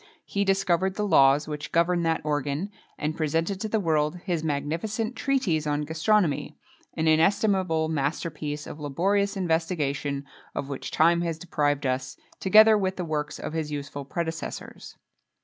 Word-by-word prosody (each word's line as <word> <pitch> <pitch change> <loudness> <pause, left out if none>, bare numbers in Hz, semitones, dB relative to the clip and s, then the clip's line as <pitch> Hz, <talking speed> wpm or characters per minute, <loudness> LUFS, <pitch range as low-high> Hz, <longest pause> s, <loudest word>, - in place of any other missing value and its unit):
He 200 - -1
discovered 190 -1 +1
the 210 - -1
laws 140 -4 +5
which 150 -1 -5
govern 170 +1 +2
that 165 -1 0
organ, 145 +5 -2 0.3
and 155 +1 -2
presented 165 +5 -1
to 220 - -1
the 220 - +1
world 155 -3 +1
his 170 -4 -1
magnificent 165 - -2
treatise 195 - 0
on 150 0 0
gastronomy[XXII 160 +1 +1
16] - - -38 0.4
an 160 - 0
inestimable 180 0 +3
master 160 +2 -1
piece 150 0 -5
of 150 - -8
laborious 195 +8 0
investigation 155 -5 -1 0.3
of 140 - -3
which 140 - -5
time 170 +2 +3
has 165 -2 -2
deprived 145 -4 -1
us, 130 0 -2 0.2
together 215 +2 +6
with 190 -1 -1
the 180 - -3
works 150 -2 -3
of - - -6
his 155 -2 -2
useful 145 -1 -5
predecessors. 160 +3 -5
160 Hz, 155 wpm, -26 LUFS, 150-190 Hz, 0.4 s, together